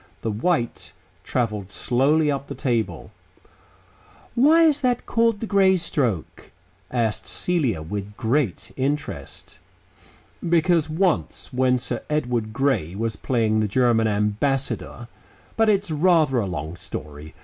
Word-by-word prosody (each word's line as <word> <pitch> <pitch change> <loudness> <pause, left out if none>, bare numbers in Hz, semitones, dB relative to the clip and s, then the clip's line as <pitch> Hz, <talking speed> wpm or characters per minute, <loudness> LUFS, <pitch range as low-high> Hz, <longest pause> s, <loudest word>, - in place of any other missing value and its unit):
The 115 - -1
white 120 +3 -1 0.3
travelled 105 -6 -2
slowly 145 +8 +2
up 140 0 -3
the - - -6
table. 120 -4 -2 1.2
"Why 310 +7 +5
is 305 -3 +3
that 250 -2 0
called 230 -2 +2
the - - -1
Grey 195 -3 +4
stroke?" 125 - -2 0.4
asked 115 -4 -1
Celia 135 - 0
with 100 +4 -6
great 115 -3 -1
interest. 140 +3 -4 0.9
"Because 165 -1 +3
once, 165 -4 -1
when 125 0 +3
Sir 125 - -3
Edward 120 -7 -1
Grey 115 - 0
was 110 +1 -2
playing 110 -2 0
the 110 - +1
German 115 0 +2
Ambassador 115 +4 -1 0.5
but 225 -1 +3
it's 200 -4 +1
rather 155 -4 +3
a 105 - -1
long 80 -2 -5
story. 75 -4 -8
130 Hz, 125 wpm, -23 LUFS, 110-165 Hz, 1.2 s, Why